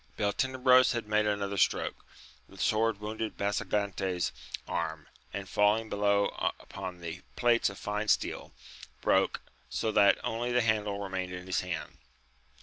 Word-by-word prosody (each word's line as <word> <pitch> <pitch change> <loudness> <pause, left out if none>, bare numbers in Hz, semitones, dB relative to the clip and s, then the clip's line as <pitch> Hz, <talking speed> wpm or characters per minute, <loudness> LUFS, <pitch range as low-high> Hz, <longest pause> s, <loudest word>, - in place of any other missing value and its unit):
Beltenebros 130 +4 +4
had 115 -2 -3
made 105 0 +2
another 100 -1 -1
stroke, - - +1 0.5
the 95 - -15
sword 110 +3 +1
wounded 110 +1 -4
Basagante's 100 -3 -1 0.4
arm, 80 -2 -3 0.3
and, 100 -1 -5
falling 105 +3 +2
be - - -1
low 100 0 +3 0.3
upon 90 -1 -7
the 85 +1 -6
plates 120 -2 +3
of 100 - -9
fine 105 +1 -3
steel, - - 0 0.5
broke, - - +2 0.3
so 110 - -1
that 100 -1 +5
only 120 +2 -1
the 120 0 +3
handle 105 -3 +1
remained 95 -1 -3
in 90 0 -7
his 95 - 0
hand. 90 -2 -5
105 Hz, 145 wpm, -30 LUFS, 95-110 Hz, 0.5 s, that